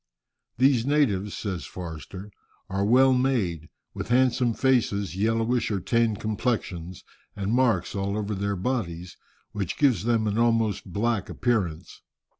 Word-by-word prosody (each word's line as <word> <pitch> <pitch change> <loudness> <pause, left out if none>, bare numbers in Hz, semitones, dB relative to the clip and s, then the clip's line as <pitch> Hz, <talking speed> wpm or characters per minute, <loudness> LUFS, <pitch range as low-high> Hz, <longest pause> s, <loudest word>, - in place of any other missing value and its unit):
"These 130 -1 +4
natives," 120 -9 +1
says 90 - -4
Forster, 90 +3 -8 0.4
"are 95 +1 0
well 130 +5 +5
made, 110 - 0 0.2
with - - -5
handsome 125 -1 +2
faces, 110 -8 +1
yellowish 115 +3 +1
or 100 -3 -1
tanned 115 +2 +1
complexions, 100 -6 -3 0.3
and 100 +2 -2
marks 120 -8 +2
all 100 +1 -2
over 105 0 -2
their 100 +1 -2
bodies, 90 -5 -3 0.4
which 100 -4 -4
gives 135 -7 +2
them 115 -2 +2
an 105 +1 0
almost 115 -5 +1
black 110 +2 -1
appearance. 100 -10 -2
110 Hz, 130 wpm, -26 LUFS, 95-120 Hz, 0.4 s, well